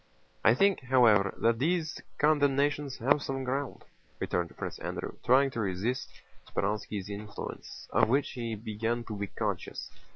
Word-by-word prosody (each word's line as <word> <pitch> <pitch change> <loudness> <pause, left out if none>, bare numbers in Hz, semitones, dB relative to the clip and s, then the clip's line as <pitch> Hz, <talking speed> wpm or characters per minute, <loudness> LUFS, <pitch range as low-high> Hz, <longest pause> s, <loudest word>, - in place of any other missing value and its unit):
"I 115 - +6
think, 195 +7 +4
however, 115 -7 +4
that 115 0 +2
these 160 +2 0 0.2
condemnations 145 -2 +2
have 135 +5 +3
some 135 -1 -3
ground," 135 +1 -3 0.3
returned 85 -2 -2
Prince - - -5
Andrew, - - -4
trying 135 +2 +5
to 115 - -4
resist 105 +5 -1 0.4
Speránski's 105 -1 -2
influence, 105 0 -7
of - - +4
which 135 +3 +2
he 115 -2 -3
began 115 +2 -2
to 110 - -6
be 100 0 -3
conscious. - - -4
120 Hz, 140 wpm, -30 LUFS, 105-140 Hz, 0.4 s, I